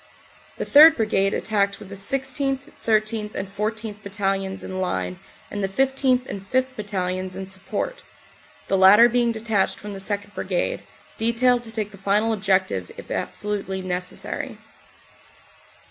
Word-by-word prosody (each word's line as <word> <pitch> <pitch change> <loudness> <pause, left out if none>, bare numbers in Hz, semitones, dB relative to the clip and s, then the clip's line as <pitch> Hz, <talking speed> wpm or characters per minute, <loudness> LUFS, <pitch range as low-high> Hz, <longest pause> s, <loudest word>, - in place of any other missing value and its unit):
The - - -3
3rd. 315 +3 +8
Brigade 195 -3 +2
attacked 200 -2 0
with 190 - -12
the - - -8
16th., 270 +5 -1
13th. 215 -1 0
and 195 +1 -5
14th. 215 0 -3
Battalions 195 -1 -2
in 185 0 -4
line 180 0 -2 0.3
and 205 -1 -3
the - - +2
15th. 265 +2 +2
and 200 - -6
5th. 260 +6 -1
Battalions 185 -3 -3
in 190 0 -5
support 195 - -4 0.7
the 195 - +2
latter 205 +5 +8
being 240 0 +2
detached 220 -3 0
from 205 0 -8
the 195 - -7
2nd. 205 +1 -3
Brigade, - - -1 0.4
detailed 240 +2 +3
to 225 - -8
take 215 -2 -3
the 200 - -13
final 210 +3 +2
objective, 190 - 0
if - - -10
absolutely 195 -2 -3
necessary. 180 0 -4
205 Hz, 145 wpm, -23 LUFS, 195-230 Hz, 0.7 s, 3rd